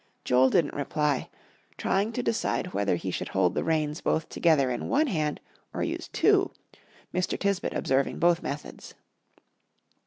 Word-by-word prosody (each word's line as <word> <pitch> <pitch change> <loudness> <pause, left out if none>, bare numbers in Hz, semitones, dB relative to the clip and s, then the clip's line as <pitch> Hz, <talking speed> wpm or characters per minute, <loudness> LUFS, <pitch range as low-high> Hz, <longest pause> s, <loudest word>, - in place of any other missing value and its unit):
Joel 130 +1 +4
didn't 150 +2 +2
reply, 145 -1 -1 0.5
trying 200 +3 0
to 245 - -2
decide 185 -4 -1
whether 100 -3 +1
he 95 +2 -4
should - - -3
hold - - +1
the - - -1
reins 155 -1 0
both 160 - 0
together 145 -6 +3
in 120 - -3
one 300 +3 +3
hand 155 - -1 0.4
or - - -1
use - - -3
two, - - +3 0.6
Mr. 180 0 0
Tisbett 200 -2 -1
observing 135 +1 0
both 175 0 +3
methods. 145 +1 -7
155 Hz, 150 wpm, -27 LUFS, 135-180 Hz, 0.6 s, Joel